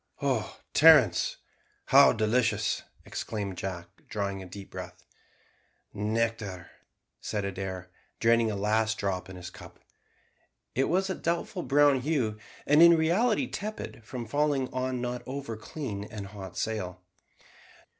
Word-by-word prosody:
"Oh, -, -, -1 dB
Terence, -, -, +6 dB, 0.5 s
how 140 Hz, +1 st, +7 dB
delicious!" 110 Hz, -1 st, +1 dB, 0.2 s
exclaimed 100 Hz, -4 st, -4 dB
Jack, 90 Hz, -3 st, -5 dB, 0.2 s
drawing 100 Hz, -3 st, -3 dB
a 95 Hz, -, -9 dB
deep 95 Hz, +2 st, -10 dB
breath. -, -, -8 dB, 0.9 s
"Nectar," 105 Hz, -4 st, -2 dB, 0.5 s
said 105 Hz, -2 st, -3 dB
Adair, 95 Hz, -2 st, -5 dB, 0.3 s
draining 115 Hz, 0 st, +4 dB
a 105 Hz, -, -2 dB
last 110 Hz, +2 st, +1 dB
drop 95 Hz, -2 st, -2 dB
in 95 Hz, -, -9 dB
his 90 Hz, -1 st, -8 dB
cup. -, -, -13 dB, 1.0 s
It 135 Hz, -, +2 dB
was 190 Hz, +3 st, +1 dB
of -, -, -3 dB
a -, -, -16 dB
doubtful 170 Hz, +2 st, -1 dB
brown 145 Hz, -3 st, +4 dB
hue, 125 Hz, -7 st, -1 dB, 0.3 s
and 150 Hz, +3 st, +5 dB
in 170 Hz, 0 st, +8 dB
reality 210 Hz, -, +2 dB
tepid 210 Hz, -, -6 dB
from 120 Hz, +1 st, -6 dB
falling 145 Hz, +2 st, 0 dB
on 130 Hz, 0 st, -1 dB
the 125 Hz, -, -3 dB
not 125 Hz, 0 st, -4 dB
over 135 Hz, -3 st, -5 dB
clean 105 Hz, -2 st, -6 dB
and 105 Hz, -2 st, -7 dB
hot 95 Hz, -2 st, -9 dB
sail. 90 Hz, -5 st, -3 dB
110 Hz, 135 wpm, -28 LUFS, 100-140 Hz, 1.0 s, in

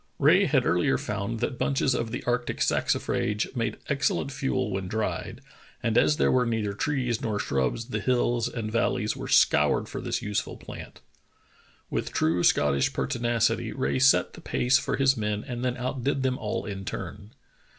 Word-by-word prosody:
Rae -, -, +5 dB
had -, -, +2 dB
earlier -, -, +2 dB
found 110 Hz, +3 st, -4 dB
that 130 Hz, -, -2 dB
bunches 135 Hz, -1 st, +1 dB
of 115 Hz, -2 st, -2 dB
the -, -, -5 dB
arctic 120 Hz, 0 st, -1 dB
saxifrage 105 Hz, +5 st, 0 dB
made 115 Hz, -2 st, -1 dB
excel 140 Hz, -1 st, +1 dB
lent 140 Hz, -, -4 dB
fuel 130 Hz, -4 st, -1 dB
when 95 Hz, -1 st, -3 dB
dried, 110 Hz, +3 st, -3 dB, 0.4 s
and 115 Hz, -2 st, 0 dB
as 150 Hz, +5 st, +4 dB
there -, -, +3 dB
were 130 Hz, -1 st, +3 dB
neither 110 Hz, -3 st, -1 dB
trees 125 Hz, 0 st, -1 dB
nor 110 Hz, -3 st, -1 dB
shrubs 70 Hz, -, -1 dB
the 110 Hz, -, -2 dB
hills 120 Hz, 0 st, +1 dB
and 110 Hz, -2 st, -4 dB
valleys 115 Hz, -, 0 dB
vvere -, -, -7 dB
scoured -, -, +4 dB
for -, -, -6 dB
this -, -, -2 dB
useful 105 Hz, -1 st, -2 dB
plant. -, -, -10 dB, 0.9 s
With -, -, -2 dB
true 85 Hz, +3 st, +1 dB
Scottish 70 Hz, -2 st, +3 dB
pertinacity, 120 Hz, -1 st, 0 dB
R.ae 70 Hz, -, -1 dB
set 135 Hz, 0 st, +4 dB
the -, -, -11 dB
pace 125 Hz, +1 st, +2 dB
for 125 Hz, -, -2 dB
his 135 Hz, 0 st, +4 dB
men 105 Hz, -2 st, -2 dB
and 120 Hz, -1 st, -4 dB
then 125 Hz, -1 st, -1 dB
outdid 130 Hz, +2 st, -2 dB
them 130 Hz, -1 st, 0 dB
all 105 Hz, -, -3 dB
in 100 Hz, -2 st, -5 dB
turn. 100 Hz, +2 st, -7 dB
115 Hz, 175 wpm, -27 LUFS, 105-130 Hz, 0.9 s, Rae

